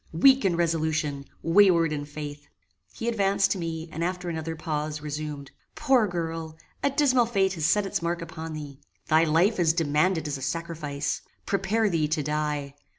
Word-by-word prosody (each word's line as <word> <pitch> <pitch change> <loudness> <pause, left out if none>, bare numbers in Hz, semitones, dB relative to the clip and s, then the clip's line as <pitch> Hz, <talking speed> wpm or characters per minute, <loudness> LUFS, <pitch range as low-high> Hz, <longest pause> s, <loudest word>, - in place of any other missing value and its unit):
weak 265 +11 +6
in 185 -3 +2
resolution! 160 -4 0 0.2
wayward 170 -3 +5
in 145 -1 -3
faith!" 145 -1 -8 0.4
He 230 - -6
advanced 200 -3 +2
to 195 - 0
me, 165 -1 -4
and, 165 - -3
after 180 0 -2
another 160 0 -4
pause, 155 -1 -3
resumed: 150 -1 -5 0.2
"Poor 255 -5 +3
girl! 165 -2 -4 0.2
a - - +2
dismal 260 -4 +3
fate 195 -4 +1
has 160 -4 0
set 205 +3 +3
its 195 - -2
mark 170 0 -1
upon 160 -1 -7
thee. 145 -3 -8 0.3
Thy 160 +1 +5
life 170 +7 +3
is 165 -2 +4
demanded 160 +1 +1
as 145 -2 -3
a - - -11
sacrifice. 155 -1 -3 0.2
Prepare 200 +3 +1
thee 165 -5 +1
to 155 0 -1
die. 150 -1 -2
165 Hz, 170 wpm, -26 LUFS, 150-190 Hz, 0.4 s, weak